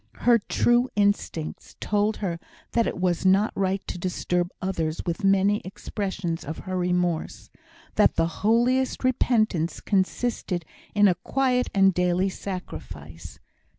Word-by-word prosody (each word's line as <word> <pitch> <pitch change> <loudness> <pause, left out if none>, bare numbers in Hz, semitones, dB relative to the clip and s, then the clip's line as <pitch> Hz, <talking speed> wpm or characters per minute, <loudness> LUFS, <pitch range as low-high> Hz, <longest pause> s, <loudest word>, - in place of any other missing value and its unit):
Her 240 -1 +5
true 240 +4 +2
instincts 200 -6 -1
told 210 +1 0
her 170 -2 -2 0.3
that 230 -1 +2
it - - -3
was 180 -2 0
not 195 +3 +4
right 195 0 -1
to - - -5
disturb 180 0 -1
others 165 -4 -2
with 175 +4 -3
many 195 +1 +3
expressions 190 -3 -4
of 155 +3 -6
her 185 - -5
remorse; 180 -2 -1 0.5
that - - +4
the - - +2 0.2
holiest 245 +6 +2
repentance 215 -9 +1
consisted 190 -3 -1 0.3
in 205 0 +6
a 185 - +4
quiet 255 +5 0
and 195 -1 +5
daily 180 +2 +1
sacrifice. 85 - -8
190 Hz, 130 wpm, -25 LUFS, 175-215 Hz, 0.5 s, in